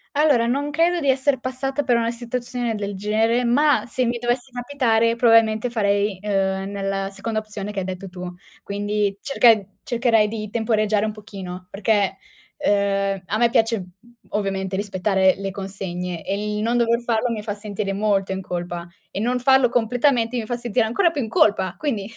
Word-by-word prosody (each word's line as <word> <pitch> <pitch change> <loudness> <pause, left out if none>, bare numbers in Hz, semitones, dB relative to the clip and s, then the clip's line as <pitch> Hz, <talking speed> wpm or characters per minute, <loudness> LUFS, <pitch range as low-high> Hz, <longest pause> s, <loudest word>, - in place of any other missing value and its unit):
Allora, 285 -6 +4
non 280 +4 -1
credo 335 +3 +2
di 285 -4 0
esser 265 +1 +2
passata 265 +3 -2
per 250 -3 +2
una 230 0 +1
situazione 240 0 -3
del 205 -1 -4
genere, 220 +4 +1
ma 285 +5 +3
se 255 +1 -1
mi 240 0 0
dovesse 245 +2 -2
capitare 240 -3 +1
probabilmente 225 -1 +4
farei, 205 -3 +1
uhm, 195 -1 -1
nella 195 -1 -2
seconda 215 +3 -3
opzione 210 -1 -6
che 205 - -3
hai 185 - -3
detto 185 +1 -6
tu. 180 0 -7 0.3
Quindi 205 0 -1
cerche 230 -7 +3
cercherei 235 -3 +2
di 215 -1 -5
temporeggiare 215 -2 +1
un 215 - -1
pochino. 190 -4 -9
Perché, 205 0 +1 0.5
uhm, 200 -2 +1
a 210 - -1
me 235 +1 +4
piace 225 -4 +2 0.4
ovviamente 195 -2 -2
rispettare 190 -1 +2
le 195 0 -4
consegne 180 -3 -5
e 210 +1 -2
il - - -2
non 235 +2 +1
dover 235 0 +2
farlo 235 0 0
mi 220 -2 -3
fa 210 - -3
sentire 205 -1 -4
molto 200 -1 0
in 190 - -4
colpa 175 -1 -4 0.3
e 190 - -4
non 250 +2 0
farlo 265 0 +4
completamente 245 0 +1
mi 230 - -2
fa 240 +2 -3
sentire 235 -2 0
ancora 340 - +2
più 295 -4 -2
in 225 - -3
colpa. 190 -4 +2
Quindi 230 -10 -2
215 Hz, 175 wpm, -22 LUFS, 195-240 Hz, 0.5 s, Allora